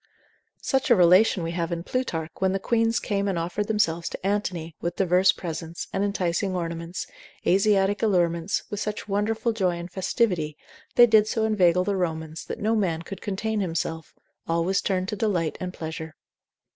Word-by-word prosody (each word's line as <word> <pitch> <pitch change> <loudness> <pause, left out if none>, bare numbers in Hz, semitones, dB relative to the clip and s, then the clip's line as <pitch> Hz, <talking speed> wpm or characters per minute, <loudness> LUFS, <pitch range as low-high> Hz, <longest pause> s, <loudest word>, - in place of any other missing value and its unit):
Such 270 -1 +1
a 240 - +7
relation 180 +1 +5
we 165 - -2
have 170 0 -2
in 170 0 -3
Plutarch, 170 -10 -2
when 190 0 +2
the 195 - 0
queens 230 +2 +1
came 200 -1 -1
and 190 -3 0
offered 175 +5 -2
themselves 170 -6 0
to - - -8
Antony, 180 -6 -2
with 170 0 -2
diverse 185 0 +4
presents, 165 -1 -6
and 195 - 0
enticing 190 -1 0
ornaments, 170 0 -4 0.4
Asiatic 195 +1 +3
allurements, 175 -4 +1
with 205 - -3
such 210 0 -4
wonderful 215 +3 0
joy 185 -5 0
and 170 +1 -7
festivity, 180 - 0 0.4
they 240 - +9
did 220 -2 +5
so 220 0 0
inveigle 180 -5 +3
the 200 +1 -1
Romans, 160 -3 -3
that - - -5
no 220 +2 +1
man 170 -6 0
could 195 +3 -8
contain 215 +2 -2
himself, 165 -3 -3 0.3
all 165 0 +1
was 190 +3 +1
turned 185 -1 -1
to - - -2
delight 185 -7 0
and 180 -1 -3
pleasure. 160 -2 -6
185 Hz, 175 wpm, -25 LUFS, 170-205 Hz, 0.4 s, they